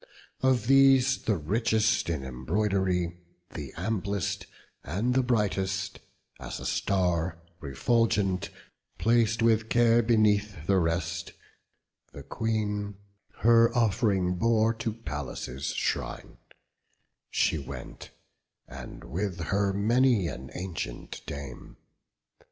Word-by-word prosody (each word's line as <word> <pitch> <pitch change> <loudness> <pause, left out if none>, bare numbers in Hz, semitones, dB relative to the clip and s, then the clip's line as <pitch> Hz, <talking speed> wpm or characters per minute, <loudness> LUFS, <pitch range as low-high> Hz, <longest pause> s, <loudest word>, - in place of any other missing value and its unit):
Of 130 -4 +2
these, 135 0 +5
the 105 -3 0
richest 110 +5 +1
in 75 -5 -2
embroidery, 90 +6 -1 0.3
The 75 -4 -7
amplest, 100 0 -2 0.4
and 105 - -1
the 130 - +3
brightest, 100 -4 -1 0.4
as - - -6
a - - -8
star 90 -3 0 0.2
Refulgent, 95 - +1 0.5
plac'd 115 0 +2
with 110 -1 +3
care 120 0 +4
beneath 105 -6 +2
the 95 0 +3
rest, 85 0 -2 0.8
The - - -9
Queen 105 -2 -2 0.5
her 115 0 +6
off'ring 100 -5 +2
bore 115 -1 +3
to 115 0 -3
Pallas' 70 - -5
shrine: - - -3 0.9
She 80 - +1
went, 70 - -9 0.6
and - - -9
with 95 0 -3
her 100 +3 0
many 115 +1 +3
an 65 -2 -7
ancient 85 -9 -5
dame. 70 -3 -8
100 Hz, 100 wpm, -28 LUFS, 85-115 Hz, 0.9 s, her